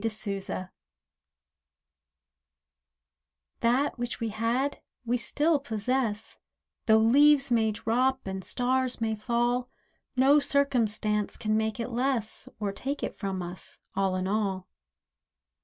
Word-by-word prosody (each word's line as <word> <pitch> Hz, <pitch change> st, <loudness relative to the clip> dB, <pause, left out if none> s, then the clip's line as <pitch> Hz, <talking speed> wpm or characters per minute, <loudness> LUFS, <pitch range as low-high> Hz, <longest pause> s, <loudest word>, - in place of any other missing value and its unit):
POSSESSION 200 Hz, -4 st, -3 dB, 2.9 s
That 250 Hz, +3 st, +1 dB
which 240 Hz, 0 st, -3 dB
we 230 Hz, -, -2 dB
had 235 Hz, +6 st, -1 dB, 0.2 s
we 240 Hz, +1 st, +1 dB
still 295 Hz, +5 st, +1 dB
possess, 225 Hz, -3 st, -2 dB, 0.5 s
Though 220 Hz, -1 st, +7 dB
leaves 275 Hz, +4 st, +5 dB
may 220 Hz, -2 st, +3 dB
drop 250 Hz, +5 st, 0 dB
and 190 Hz, 0 st, -4 dB
stars 255 Hz, +2 st, 0 dB
may 225 Hz, -1 st, 0 dB
fall; 240 Hz, +3 st, 0 dB, 0.5 s
No 270 Hz, +3 st, +5 dB
circumstance 220 Hz, -8 st, +1 dB
can 215 Hz, 0 st, 0 dB
make 220 Hz, +1 st, -1 dB
it 230 Hz, -, -3 dB
less, 240 Hz, -2 st, -1 dB
Or 205 Hz, -2 st, -1 dB
take 275 Hz, +8 st, -4 dB
it -, -, -3 dB
from 190 Hz, -3 st, -3 dB
us, 175 Hz, +1 st, -5 dB, 0.2 s
all 195 Hz, -1 st, +1 dB
in 185 Hz, 0 st, -1 dB
all. 195 Hz, -3 st, -1 dB
230 Hz, 115 wpm, -28 LUFS, 210-260 Hz, 2.9 s, Though